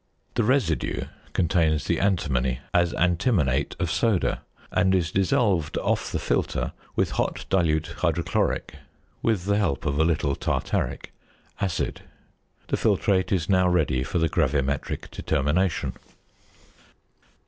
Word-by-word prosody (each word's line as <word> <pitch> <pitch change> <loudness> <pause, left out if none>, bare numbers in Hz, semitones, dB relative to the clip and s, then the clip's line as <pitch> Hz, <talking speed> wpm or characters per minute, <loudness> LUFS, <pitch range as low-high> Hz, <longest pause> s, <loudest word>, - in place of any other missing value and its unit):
The 120 - +1
residue 105 - +1 0.3
contains 80 -3 +2
the 85 - 0
antimony 70 -11 +1 0.2
as 85 -1 +3
antimonate 90 - +1
of 85 -3 -1
soda, 110 -6 +1 0.3
and 95 +1 +3
is 85 -4 0
dissolved 95 -4 +1
off - - 0
the - - -1
filter - - -1 0.2
with - - +1
hot - - -3
dilute 80 -4 +1
hydrochloric, 85 -1 0 0.4
with 105 -6 0
the 100 0 +2
help 70 -10 -1
of 70 0 0
a - - +5
little 75 -4 +1
tartaric, - - -2 0.5
acid. 95 -4 -2 0.7
The - - +1
filtrate 95 -2 +2
is 90 -3 +1
now 95 -2 +4
ready 90 -8 +2
for 80 - -2
the 80 -1 +3
gravimetric 70 -3 -1
determination. 80 +5 0
85 Hz, 125 wpm, -25 LUFS, 75-95 Hz, 0.7 s, a